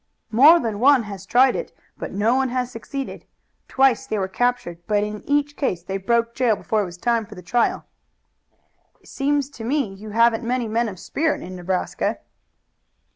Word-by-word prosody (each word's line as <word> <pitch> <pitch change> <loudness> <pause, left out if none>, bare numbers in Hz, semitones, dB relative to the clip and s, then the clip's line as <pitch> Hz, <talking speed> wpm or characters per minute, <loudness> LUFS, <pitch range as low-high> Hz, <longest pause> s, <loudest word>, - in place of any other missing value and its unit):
"More 290 +10 +7
than 220 -6 -3
one 265 0 +5
has 200 -4 -9
tried 255 +1 +4
it, - - -4 0.2
but - - -6
no 210 +4 +1
one 265 0 +1
has 250 0 -2
succeeded. 270 +3 -6 0.4
Twice 265 -3 +2
they 215 - -2
were 190 -2 -1
captured, 245 -5 -1
but 210 -1 +2
in 210 0 -5
each 290 0 +1
case 180 - -2
they 190 +2 -3
broke 230 +4 0
jail 240 -4 +2
before 215 +2 -1
it - - -1
was 175 -1 -9
time 235 +3 +1
for 210 0 -12
the 180 - -11
trial." 235 +8 0 1.1
"It - - -23
seems 285 0 0
to 230 - -10
me 250 -4 -1
you 210 +3 -10
haven't 230 +1 +3
many 245 0 -1
men 230 +1 0
of 190 - -9
spirit 310 - -1
in 185 +1 -8
Nebraska." 180 +1 -2
230 Hz, 185 wpm, -22 LUFS, 205-255 Hz, 1.1 s, More